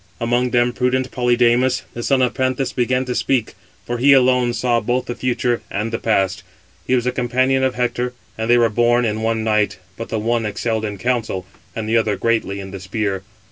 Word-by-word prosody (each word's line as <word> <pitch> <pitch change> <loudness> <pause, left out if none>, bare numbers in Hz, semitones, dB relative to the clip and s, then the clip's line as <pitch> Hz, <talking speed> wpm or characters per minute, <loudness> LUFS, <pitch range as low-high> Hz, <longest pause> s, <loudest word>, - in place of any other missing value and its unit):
Among 120 +2 +1
them 120 0 +2
prudent 130 +1 0
Polydamas, 125 +1 +2
the 120 - -5
son 130 +1 +2
of 125 - +1
Panthus, 130 0 -1
began 125 +1 0
to 125 - -2
speak, 125 -2 0 0.3
for 120 0 -3
he 140 +3 +6
alone 125 -2 +4
saw 120 0 +1
both 120 +3 -1
the 120 - -4
future 120 -1 -1
and 105 +2 -3
the 115 - -1
past. 100 -3 0 0.5
He 130 - +3
was 125 - +1
the 125 - 0
companion 130 +2 +1
of 130 -1 +1
Hector, 125 0 -1 0.2
and 110 +1 -3
they 120 - +6
were 120 -1 +4
born 120 +2 +2
in 110 0 -1
one 115 0 0
night, 105 -1 +1 0.2
but 115 - -6
the 110 - -2
one 115 +2 0
excelled 110 +1 -2
in 105 -1 -4
counsel, 110 -4 -1 0.3
and 110 -1 -4
the 115 +1 +2
other 110 -2 +1
greatly 110 -3 -1
in 95 -1 -8
the 95 - -7
spear. 95 0 -2
120 Hz, 210 wpm, -20 LUFS, 110-125 Hz, 0.5 s, he